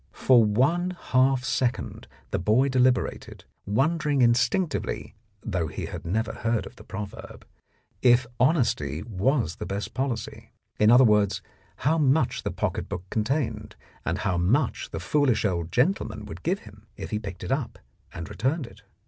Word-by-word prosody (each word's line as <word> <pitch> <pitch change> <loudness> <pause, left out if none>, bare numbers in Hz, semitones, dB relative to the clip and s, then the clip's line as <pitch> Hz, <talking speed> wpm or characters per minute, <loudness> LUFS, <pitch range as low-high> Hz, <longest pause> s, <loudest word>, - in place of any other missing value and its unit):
For 125 -3 +5
one 160 - +1
half 130 0 +2
second 125 -1 -2 0.2
the - - 0
boy 110 +10 +3
deliberated, 130 -3 0 0.2
wondering 145 +5 +2
instinctively 130 +8 +1 0.3
(though 85 -3 -1
he - - -5
had - - -7
never 110 +6 -1
heard 115 -1 -1
of - - -11
the - - -12
proverb) 105 0 -8 0.6
if 120 0 +5
honesty 115 - +1
was 110 - 0
the - - -5
best 100 +2 -4
policy, 130 -1 -4 0.3
in 105 - +5
other 125 +3 +8
words, 100 -4 +3 0.3
how 160 - +1
much 140 -2 +2
the - - -2
pocket - - -3
book 90 - -4
contained, 130 +5 -1 0.3
and - - -1
how 90 -2 -1
much 120 - +1
the 80 - -5
foolish 125 - +1
old 85 -4 -1
gentleman 110 - 0
would 105 - -9
give 185 +4 -1
him 105 +1 -16
if - - -7
he 105 - -1
picked 95 -4 -8
it - - -4
up 135 -2 -2 0.3
and 85 -1 -7
returned 135 +5 -1
it. 110 -2 -15
120 Hz, 155 wpm, -26 LUFS, 105-135 Hz, 0.6 s, other